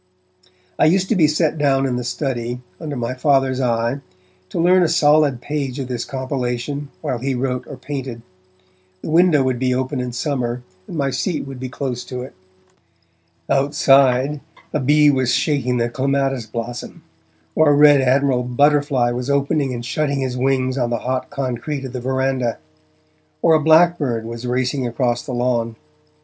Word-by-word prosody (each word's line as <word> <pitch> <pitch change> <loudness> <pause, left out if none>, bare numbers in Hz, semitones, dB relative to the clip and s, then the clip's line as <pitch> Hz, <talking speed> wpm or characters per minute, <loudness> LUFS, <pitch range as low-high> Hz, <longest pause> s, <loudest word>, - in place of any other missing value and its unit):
I - - +5
used 185 +4 +2
to 225 - +2
be 160 -5 +4
set 155 +1 0
down 135 -2 +2
in 130 -2 -1
the 125 - -3
study, 120 -1 -3 0.2
under 150 -3 -5
my 120 0 -2
Father's 135 -1 +1
eye, 120 +2 0 0.5
to - - -4
learn 180 +2 +4
a 175 - +4
solid 150 -5 +3
page 140 -3 -3
of 135 -2 -5
this 120 -2 -3
compilation, 130 +1 -3
while 125 - -2
he 135 +2 -2
wrote 125 -1 -2
or - - -8
painted. 130 -5 -6 0.8
The - - -4
window 165 -4 +4
would 130 -2 -1
be 125 -1 +1
open 130 +1 -2
in 125 0 -3
summer, 125 -2 -2 0.2
and 170 - -6
my 140 -2 0
seat 150 +6 -2
was 135 -2 -8
close 125 -2 -4
to 125 -1 -5
it. 130 - -10 1.1
Outside, 135 0 +3 0.3
a 150 - +1
bee 150 +2 +4
was 130 -3 +1
shaking 130 -5 0
the 120 0 +1
clematis 135 -1 -1
blossom, 115 +2 -6 0.5
or 155 -1 +4
a 145 - +5
red 145 -1 +6
admiral 130 0 +2
butterfly 135 0 +2
was 125 +2 -4
opening 140 0 +1
and 120 -1 -5
shutting 140 +1 -1
his 130 -1 -2
wings 130 0 0
on 120 -1 0
the 120 - 0
hot 130 0 -2
concrete 135 +2 -4
of 130 - -7
the 125 - -4
verandah, 130 -2 -1 0.9
or 160 - +5
a 155 - +5
blackbird 155 -7 +3
was 115 +1 -6
racing 130 +1 -1
across 120 0 -1
the 135 - -6
lawn. 120 -2 0
130 Hz, 170 wpm, -20 LUFS, 125-145 Hz, 1.1 s, red